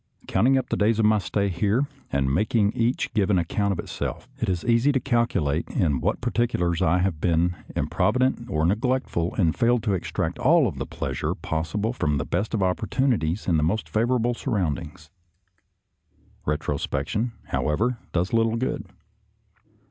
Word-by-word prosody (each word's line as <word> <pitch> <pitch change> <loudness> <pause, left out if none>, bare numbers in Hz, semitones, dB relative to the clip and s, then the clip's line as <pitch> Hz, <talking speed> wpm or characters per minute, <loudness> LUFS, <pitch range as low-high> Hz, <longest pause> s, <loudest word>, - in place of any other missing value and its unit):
Counting 125 +8 +3
up 130 - -2
the - - 0
days 105 +2 +2
of 110 - +3
my 110 0 +4
stay 100 +1 -1
here, 105 +8 +1 0.3
and 70 -1 +1
making 105 +3 +2
each 120 +3 -1
give 105 -3 +1
an 100 - +3
account 100 +4 0
of 95 - -1
itself, - - -5
it - - -1
is 90 -2 -2
easy 120 +4 +4
to 135 - +1
calculate 100 - 0
in 75 -8 0
what - - 0
particulars 115 -8 0
I 90 0 +3
have 90 -4 -1
been 85 +1 +2 0.2
im - - 0
provident 125 +1 +1
or 80 +1 +1
neglectful, 105 -3 0
and 85 -6 +2
failed 120 -1 +2
to 100 - +1
extract 95 - -2
all - - +4
the - - -6
pleasure - - -3
possible 100 +9 -2
from 75 - 0
the 70 - -2
best 100 +6 -1
of 100 - 0
op 90 -1 +1
portunities 110 - 0
and 85 -4 +3
the - - +1
most 105 +8 0
favorable 120 +2 +1
surround 100 - -1
ings. 80 -1 -12 1.4
Retrospection, 75 - -1 0.2
however, 110 +11 0
does 90 +4 -1
little 115 0 +2
good. 125 +3 -2
100 Hz, 170 wpm, -25 LUFS, 85-115 Hz, 1.4 s, my